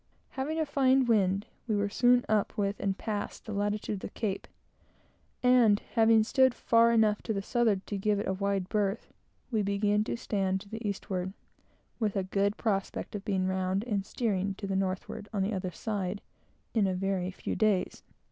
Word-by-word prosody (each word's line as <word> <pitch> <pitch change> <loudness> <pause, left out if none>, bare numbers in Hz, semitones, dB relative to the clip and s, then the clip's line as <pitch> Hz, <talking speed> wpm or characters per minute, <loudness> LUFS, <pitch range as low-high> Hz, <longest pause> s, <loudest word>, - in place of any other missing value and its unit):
Having 295 +5 -3
a 315 - +1
fine 270 -2 +3
wind, 200 -4 +2 0.2
we 220 - +1
were 205 0 +1
soon 245 +4 +3
up 215 -2 +1
with 200 0 -1
and 195 -1 -1
passed 210 -2 -4
the 215 - -5
latitude 205 +1 -1
of - - -8
the - - -6
Cape, 200 -3 -3 1.0
and 245 -5 +5
having 225 -1 +5
stood 260 +2 +3
far 230 0 +4
enough 220 -2 +3
to 220 - -2
the 195 - -2
southward 220 -4 +1
to 205 - -4
give 210 +1 +1
it 205 - -2
a 190 - +1
wide 195 -1 -1
berth, 205 0 -1 0.4
we 220 -3 +2
began 205 +1 +1
to - - -2
stand 195 -4 -1
to 200 - -13
the 225 +2 -6
eastward, 190 -1 -3 0.7
with 215 -3 0
a 195 - +1
good 200 +2 0
prospect 195 -4 -2
of 205 -2 -5
being 195 -3 0
round 190 +1 0
and 210 -5 -1
steering 200 -3 -1
to 200 - -6
the 195 -1 -2
northward 195 +2 -3
on 200 -3 0
the 205 +3 -1
other 185 -1 -2
side, 200 +1 -3 0.5
in 215 -4 +3
a 185 - 0
very 190 -1 -1
few 190 - -4
days. 210 -4 +1
205 Hz, 190 wpm, -30 LUFS, 195-220 Hz, 1.0 s, and